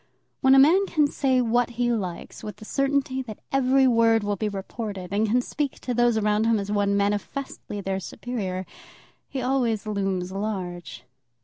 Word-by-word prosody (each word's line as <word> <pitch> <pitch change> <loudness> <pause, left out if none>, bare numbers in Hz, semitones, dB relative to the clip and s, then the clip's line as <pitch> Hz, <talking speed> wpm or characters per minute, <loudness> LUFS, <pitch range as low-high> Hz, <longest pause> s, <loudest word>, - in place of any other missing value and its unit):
When 265 0 +5
a - - +7
man 345 +9 +6
can 305 -5 +3
say 265 -3 +1
what 240 +1 +2
he 240 0 +2
likes 185 -7 -4
with 210 -2 -6
the 215 - -12
certainty 275 0 0
that 220 -5 -8
every 270 0 +4
word 230 -2 +4
will 205 0 0
be 215 +1 -2
reported, 200 -1 -6
and 215 +2 +2
can 245 +4 +2
speak 290 0 -2
to 250 - -2
those 240 -1 +3
around 210 0 +2
him 230 -1 +3
as 200 0 -3
one 200 -1 +2
manifestly 205 +2 -3
their 195 0 -2
superior, 190 -3 -4 0.6
he 260 -2 -3
always 245 -5 0
looms 195 -3 -2
large. 180 - -5
220 Hz, 175 wpm, -25 LUFS, 200-255 Hz, 0.6 s, a